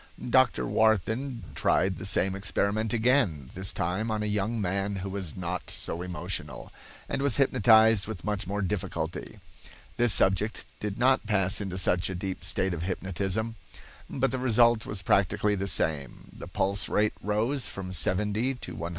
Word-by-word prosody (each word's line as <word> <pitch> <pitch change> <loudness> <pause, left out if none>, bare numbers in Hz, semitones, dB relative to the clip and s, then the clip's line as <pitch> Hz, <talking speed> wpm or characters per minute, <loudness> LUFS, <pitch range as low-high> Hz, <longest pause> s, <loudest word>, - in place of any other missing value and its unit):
Dr. 65 - +3
Warthin 110 - +1
tried 95 0 +1
the 95 - -5
same 95 0 +2
experiment 100 +3 -1
again, 115 - +1
this 95 +1 0
time 95 +7 -2
on 110 -1 -1
a - - -2
young 105 +2 -1
man 100 +1 -1
who - - -3
was 95 -5 -5
not 90 0 -4
so 85 - -5
emotional, 90 -4 -5 0.4
and - - -2
was 140 -4 +3
hypnotized 110 -5 +5
with 110 -5 -6
much 105 -2 -3
more 100 +1 -2
difficulty. 95 0 -4 0.6
This 120 -1 +4
subject 100 +3 +2
did 105 -1 -4
not 130 -2 +2
pass 95 -2 +2
into 95 -2 -4
such 90 -1 +1
a 95 - -4
deep 95 +1 -5
state 95 -1 0
of 85 - -4
hypnotism, 95 +5 -3 0.5
but 135 0 0
the 130 - -2
result 120 -2 +3
was 100 -3 -2
practically 100 +2 +2
the 100 -1 -2
same. 75 -7 -2
The - - -9
pulse 100 +1 0
rate 105 0 +1
rose 115 +6 0
from 95 -1 -6
70 105 - +2
to 125 - -9
120. 85 +1 -5
100 Hz, 165 wpm, -27 LUFS, 95-110 Hz, 0.6 s, hypnotized